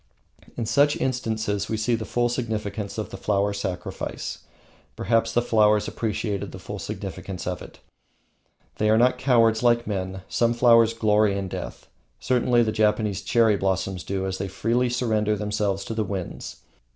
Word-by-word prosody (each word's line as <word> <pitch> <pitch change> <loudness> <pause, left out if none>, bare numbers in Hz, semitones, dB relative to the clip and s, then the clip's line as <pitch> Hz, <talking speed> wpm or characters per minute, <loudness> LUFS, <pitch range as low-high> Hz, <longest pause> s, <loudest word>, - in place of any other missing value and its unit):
In 115 - -2
such 145 +6 +3
instances 110 -5 -1
we 110 - -1
see 110 +3 0
the 110 -1 -1
full 120 +3 +1
significance 110 -4 -3
of 105 -4 -4
the - - -6
Flower 100 0 0
Sacrifice. 95 -3 -4 0.6
Perhaps 115 0 +1
the 120 +1 +2
flowers 105 -2 +3
appreciate 105 -2 -2
the - - -8
full - - -7
significance 95 -2 -6
of 90 -2 -3
it. - - -11 1.0
They 105 - +2
are 110 - +5
not 125 +2 +3
cowards, 115 -4 +3
like 120 -1 +3
men. 95 -2 -4
Some 115 0 +1
flowers 115 -1 +5
glory 105 -2 +3
in 100 -1 -3
death - - -7 0.3
certainly 125 -1 +2
the 110 - 0
Japanese 105 -2 +1
cherry 115 -3 +3
blossoms 95 -1 -1
do, 95 -1 -2
as 95 0 -3
they 95 - -2
freely 120 +5 0
surrender 110 -3 +1
themselves 105 -1 -1
to - - -4
the 110 -1 0
winds. 95 -4 -6
110 Hz, 165 wpm, -24 LUFS, 100-115 Hz, 1.0 s, are